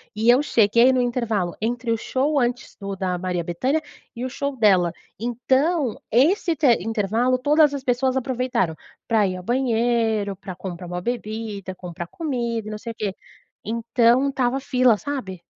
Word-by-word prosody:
e 220 +2 +2
eu 250 +3 +6
cheguei 235 0 +4
no 255 -1 +2
intervalo 230 -7 -1
entre 235 +1 -1
o 230 - +2
show 280 +5 0
antes 245 -1 -2
do 200 -1 -5
da 185 -2 -2
Maria 180 -1 -2
Bethânia, 255 - 0 0.3
e 240 +2 -4
o - - -3
show 280 +2 -3
dela. 190 -6 +4 0.3
Então, 260 +4 0
esse 325 - +3
te 295 -1 +2 0.2
intervalo 225 +3 +1
todas 295 +2 +4
as 270 - -5
pessoas 255 +1 +1
aproveitaram 250 -10 -1 0.3
pra 220 -3 +3
ir 185 -1 -3
ao 180 - -9
banheiro, 230 -4 +1
pra 190 -1 -8
comprar 180 -1 -7
uma 180 0 -4
bebida, 215 -3 -4
comprar 175 -1 -7
comida 235 - -3
e 215 - -5
não 215 - -4
sei 230 - -6
o 225 - -11
quê. 200 -3 -3 0.5
Então 235 +3 +2
estava 265 -1 0
fila, 250 -5 +3
sabe? 205 -12 -5
235 Hz, 170 wpm, -23 LUFS, 200-255 Hz, 0.5 s, eu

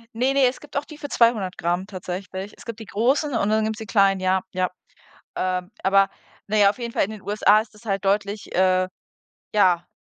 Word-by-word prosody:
Ne, 255 +4 +1
ne, 275 -1 +4
es 250 - -3
gibt 295 - -7
auch 285 - -1
die 305 -1 -11
für 290 - -7
200 225 -8 +2
Gramm 175 +2 -1
tatsächlich. 190 0 -6
Es - - -14
gibt 230 -2 -7
die 220 - -8
großen 265 +8 +1
und 200 - +1
dann 220 0 +2
gibt's 220 0 -3
die 220 - -6
kleinen, 195 -1 +3
ja, 185 0 +1
ja. 185 -1 0 0.7
Ähm, 185 0 -2
aber 195 0 +4 0.4
na 215 - 0
ja, 205 -1 +6
auf 205 - -3
jeden 235 -1 -5
Fall - - +2
in 215 - -8
den 215 -2 -9
USA 210 +1 +4
ist 220 - -13
das 210 +2 -18
halt 195 -3 -2
deutlich, 200 +1 -1
äh 185 0 +3 0.7
ja, 180 -4 +3
205 Hz, 220 wpm, -23 LUFS, 185-225 Hz, 0.7 s, ja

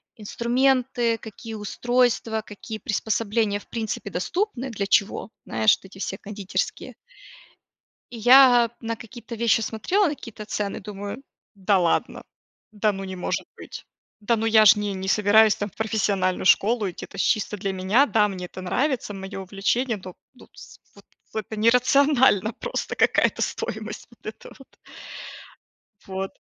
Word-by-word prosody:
инструменты, 240 +1 +1
какие 225 +1 -10
устройства, 230 +1 0
какие 215 +2 -8
приспособления, 215 -1 -1
в - - -19
принципе, 220 -3 -4
доступны, 265 - -2
для 200 -4 -3
чего, 200 +2 +1 0.2
знаешь, 110 -1 +3
вот - - -20
эти 190 0 -14
все 195 - -4
кондитерские. 200 -1 -4 1.2
И 240 - -8
я, 245 +1 +7
а, 230 - -4
на 230 0 -3
какие-то 235 +1 -10
вещи 230 0 +2
смотрела, 290 - 0
на 300 - -2
какие-то 225 -6 -10
цены, 205 -1 -3
думаю: 205 +4 -7 0.3
да 195 0 +2
ладно! 175 -2 0 0.5
Да 210 0 +1
ну, 195 0 -6
не 190 -1 -6
может 180 - -3
быть. - - -10 0.3
Да 230 +3 +1
ну 225 +1 -1
я 220 -1 +6
ж 215 +1 +8
не 205 -1 -2
не 190 0 -5
собираюсь, 210 +1 +5
там, 205 0 -4
в - - -31
профессиональную 200 -4 0
школу 215 +2 +3
идти, - - -9
это 195 - -13
ж - - -1
чисто 210 0 0
для 195 -1 -3
меня. 190 +9 +3
Да, 215 -6 +3
мне 185 -2 -6
это 185 - -10
нравится, 250 +3 -1
мое 195 0 -7
увлечение, 205 +6 -1
но 185 -1 -8 0.2
но 250 - -17
с - - -14 0.2
вот - - -18 0.3
в - - -11
это 220 0 -4
нерационально 250 -1 +4
просто, - - -4
какая-то - - +2
стоимость - - -4
вот - - -20
эта - - -8
вот. - - -18 1.3
Вот. 190 0 -5
215 Hz, 160 wpm, -24 LUFS, 200-235 Hz, 1.3 s, ж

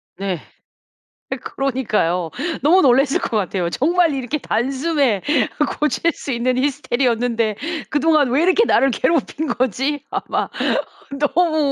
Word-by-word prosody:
네. 190 -3 -3 1.2
그러니까요. 215 -11 0 0.3
너무 345 +6 +5
놀랐을 270 -1 +3
것 225 - -2
같아요. 185 -3 -1
정말 330 - +2
이렇게 270 +3 -3
단숨에 270 - 0 0.6
고칠 300 +3 +1
수 280 - -6
있는 250 +1 0
히스테리였는데 245 -5 0 0.3
그동안 300 -2 +3
왜 275 +6 +2
이렇게 370 +6 +4
나를 270 - +3
괴롭힌 315 +3 0
거지? 265 +4 -1
아마 - - -2 0.9
너무 335 -2 +2
265 Hz, 270 characters per minute, -20 LUFS, 235-300 Hz, 1.2 s, 너무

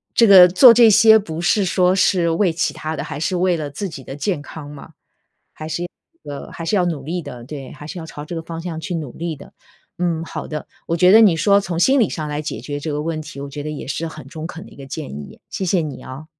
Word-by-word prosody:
这 230 - +6
个 190 -4 +9
做 230 +7 +8
这 235 -1 +7
些 220 +1 +7
不 165 -4 -6
是 195 +3 +2
说 180 0 +2
是 180 -3 +2
为 170 +1 +1
其 165 - -1
他 155 +1 -5
的， - - -4
还 150 -1 -6
是 180 +3 -1
为 180 -1 +1
了 150 -2 -4
自 190 +8 -5
己 135 -6 -10
的 135 - -7
健 150 0 -2
康 145 0 -10
嘛， 150 +2 -11 0.6
还 155 - -8
是 170 +2 -3
要 - - -5 0.5
呃， - - -10
还 165 - -7
是 205 - +1
要 180 - +3
努 160 -6 -2
力 170 +5 -4
的， 120 -4 -9
对， 135 -1 -8
还 150 0 -11
是 180 +3 -7
要 160 - -7
朝 150 -2 -9
这 170 - -6
个 165 - -4
方 165 0 -7
向 165 -2 -5
去 175 +2 -5
努 150 -7 -4
力 165 -1 -4
的。 140 - -15 0.4
嗯， 170 -2 -1
好 - - -6
的， 150 -1 -6 0.2
我 165 - -1
觉 180 +2 +5
得 225 +2 +8
你 190 -6 +6
说 200 +5 +4
从 175 -2 -4
心 270 +7 +4
理 225 - +2
上 155 -2 -4
来 150 +1 -3
解 155 - -5
决 145 -1 -5
这 150 +1 -4
个 150 - -2
问 155 0 -3
题， 155 -2 -10
我 140 - -6
觉 145 +1 -7
得 150 - -5
也 150 - -7
是 160 +4 -3
很 160 - -9
中 155 +2 -7
肯 170 +1 -9
的 - - -15
一 - - -16
个 140 - -10
建 150 +1 -6
议， 70 0 -9
谢 190 - -4
谢 180 -1 +2
你 145 -5 -6
啊。 130 +4 -9
165 Hz, 300 characters per minute, -20 LUFS, 150-180 Hz, 0.6 s, 个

